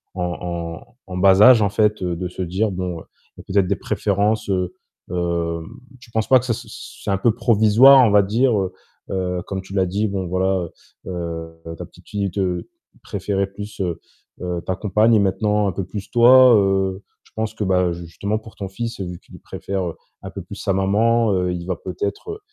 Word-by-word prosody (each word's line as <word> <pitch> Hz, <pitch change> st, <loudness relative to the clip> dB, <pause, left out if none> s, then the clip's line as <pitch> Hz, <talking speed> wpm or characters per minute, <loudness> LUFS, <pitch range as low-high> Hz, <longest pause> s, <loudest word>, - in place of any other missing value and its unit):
en 90 Hz, -, -2 dB, 0.2 s
en 85 Hz, +4 st, -6 dB
en 90 Hz, -, -6 dB
bas 95 Hz, +1 st, +5 dB
âge, 125 Hz, -1 st, +8 dB
en 100 Hz, -, +2 dB
fait, 105 Hz, +1 st, +1 dB
heu, 90 Hz, -1 st, -1 dB
de 90 Hz, +1 st, -3 dB
se 90 Hz, -, -7 dB
dire: 95 Hz, +4 st, -1 dB
«Bon, 90 Hz, -2 st, -4 dB, 0.4 s
il -, -, -14 dB
y -, -, -7 dB
a -, -, -17 dB
peut-être 100 Hz, -2 st, +3 dB
des -, -, +1 dB
préférences». 105 Hz, +1 st, 0 dB
Heu, 90 Hz, -2 st, -1 dB, 0.4 s
hem, 85 Hz, -2 st, -2 dB, 0.3 s
tu 115 Hz, -, -16 dB
penses 110 Hz, -1 st, -1 dB
pas 130 Hz, -, +6 dB
que 125 Hz, -, -7 dB
ça, 120 Hz, -, 0 dB
c -, -, -8 dB, 0.4 s
c'est -, -, -4 dB
un 100 Hz, -, +2 dB
peu 110 Hz, +2 st, +2 dB
provisoire, 120 Hz, +3 st, +6 dB
on 110 Hz, -, +2 dB
va 105 Hz, 0 st, +6 dB
dire? 115 Hz, +6 st, +2 dB
Heu, 95 Hz, -1 st, -2 dB, 0.4 s
heu, 90 Hz, -1 st, -2 dB
comme 95 Hz, -1 st, -3 dB
tu 95 Hz, 0 st, -12 dB
l'as 95 Hz, -2 st, +2 dB
dit, 100 Hz, +4 st, -1 dB
bon, 95 Hz, -2 st, -3 dB
voilà, 95 Hz, 0 st, 0 dB, 0.4 s
heu, 85 Hz, -2 st, -5 dB
heu, 80 Hz, 0 st, -7 dB
ta -, -, -7 dB
petite -, -, -20 dB
fille 100 Hz, -1 st, -2 dB
te 90 Hz, -2 st, -2 dB, 0.3 s
préférait 100 Hz, 0 st, -2 dB
plus, 105 Hz, +2 st, -9 dB
heu, 90 Hz, -4 st, -2 dB, 0.4 s
heu, 90 Hz, -1 st, -3 dB
ta 95 Hz, -, -1 dB
compagne 105 Hz, +4 st, +3 dB
et 105 Hz, -, +5 dB
maintenant 105 Hz, +1 st, +1 dB
un -, -, 0 dB
peu 95 Hz, +2 st, -4 dB
plus 100 Hz, +1 st, -8 dB
toi, 125 Hz, +1 st, +7 dB
heu, 95 Hz, -1 st, +1 dB, 0.2 s
je -, -, -25 dB
pense 110 Hz, -1 st, -2 dB
que, 110 Hz, -, -3 dB
bah, 90 Hz, -2 st, +2 dB
justement 85 Hz, +5 st, -4 dB
pour 110 Hz, 0 st, -14 dB
ton 100 Hz, -, -5 dB
fils, 115 Hz, +4 st, -5 dB
vu 90 Hz, -2 st, -5 dB
qu'il -, -, -15 dB
préfère 95 Hz, -4 st, -4 dB, 0.3 s
un -, -, -7 dB
peu -, -, -7 dB
plus -, -, -10 dB
sa 95 Hz, -, -1 dB
maman, 110 Hz, +4 st, +2 dB
heu, 90 Hz, -1 st, 0 dB
il 85 Hz, -1 st, -5 dB
va 90 Hz, 0 st, -2 dB
peut-être, 100 Hz, -, -5 dB
95 Hz, 215 wpm, -21 LUFS, 90-105 Hz, 0.4 s, âge